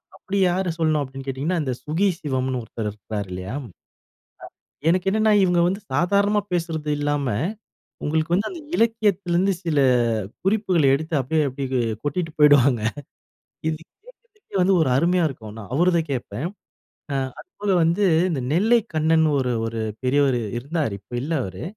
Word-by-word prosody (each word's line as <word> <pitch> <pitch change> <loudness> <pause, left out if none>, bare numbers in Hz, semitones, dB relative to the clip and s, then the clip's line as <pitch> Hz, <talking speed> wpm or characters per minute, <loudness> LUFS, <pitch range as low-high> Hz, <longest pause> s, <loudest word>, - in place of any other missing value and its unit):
அப்போ - - -17
அப்படி 200 +1 -2
யார 185 +1 0
சொல்லணும் 155 -2 +2
அப்டீன்னு 135 0 -7
கேட்டீங்கன்னா, 140 +7 -1
இந்த 130 -3 -1
சுகி 165 +8 +1
சிவம்ன்னு 130 -5 -2
ஒருத்தரு 110 -1 -4
இருக்குறாரு 105 0 -6
இல்லையா? 95 +4 -5
அ - - -11 1.2
எனக்கு 185 +2 +1
என்னன்னா, 215 +1 +3
இவங்க 180 -2 +3
வந்து 195 +3 -2
சாதாரணமா 200 +7 +3
பேசுறது 165 -3 -2
இல்லாம 145 -2 0 0.8
உங்களுக்கு 160 +2 0
வந்து 200 +4 +1
அந்த 355 -3 -7 0.2
இலக்கியத்துலேருந்து 200 -5 +2
சில 160 -4 +1 0.7
குறிப்புகள 190 -5 +2
எடுத்து 155 +3 -3
அப்படியே 150 +4 +1
அப்படியே 130 -2 -2 0.2
கொட்டிட்டு 160 +3 -2
போயிடுவாங்க. 140 -5 +5 0.9
இது 160 -1 -1
கேட்கறதுக்கே 440 - -12
வந்து 190 +2 +4
ஒரு 150 - +2
அருமையா 175 +5 +3
இருக்கும் 115 -7 -8
ஆனா. 110 +1 -9
அவருத 170 +2 +3
கேட்பேன். 125 +2 -3 0.7
அ - - 0 0.2
அதுபோல 205 - -5
வந்து 170 +5 +2 0.3
இந்த 150 -6 -1
நெல்லை 220 +9 +4 0.2
கண்ணன்னு 160 0 +3
ஒரு 125 -1 0
ஒரு 115 0 -4 0.2
பெரியவர் 135 0 +3 0.2
இருந்தாரு, 140 -1 -2
இப்ப 100 - -26
இல்ல 155 +5 -3
அவரு. 95 -1 -7
160 Hz, 145 wpm, -23 LUFS, 130-185 Hz, 1.2 s, போயிடுவாங்க